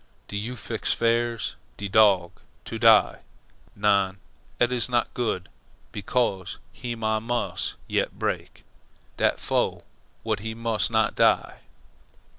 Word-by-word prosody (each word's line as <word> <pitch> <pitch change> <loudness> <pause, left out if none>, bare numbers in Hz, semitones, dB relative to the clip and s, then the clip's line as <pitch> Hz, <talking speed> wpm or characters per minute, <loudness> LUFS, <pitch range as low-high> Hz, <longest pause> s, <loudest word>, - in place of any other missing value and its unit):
"Do - - -7
you 110 +5 -3
fix 110 -1 -3
firs' 115 0 0 0.2
de 100 - -4
dog. 100 -4 +4 0.3
To 115 - -5
die? 110 -2 +6 0.6
NON. 100 -2 +2 0.4
Eet 120 0 +3
is 125 0 0
not 120 -1 0
good. 110 -7 -2 0.5
Becos' 100 -2 -1 0.2
heem 120 -2 -6
Ah 110 0 +2
mus' 110 -5 -2
yet - - -1
break. - - -3 0.5
Dat - - +2
fo' - - 0 0.4
w'at 110 -3 -1
he 110 +2 -5
mus' 115 -1 0
not 110 -1 +2
die." - - +2
110 Hz, 125 wpm, -25 LUFS, 100-115 Hz, 0.6 s, die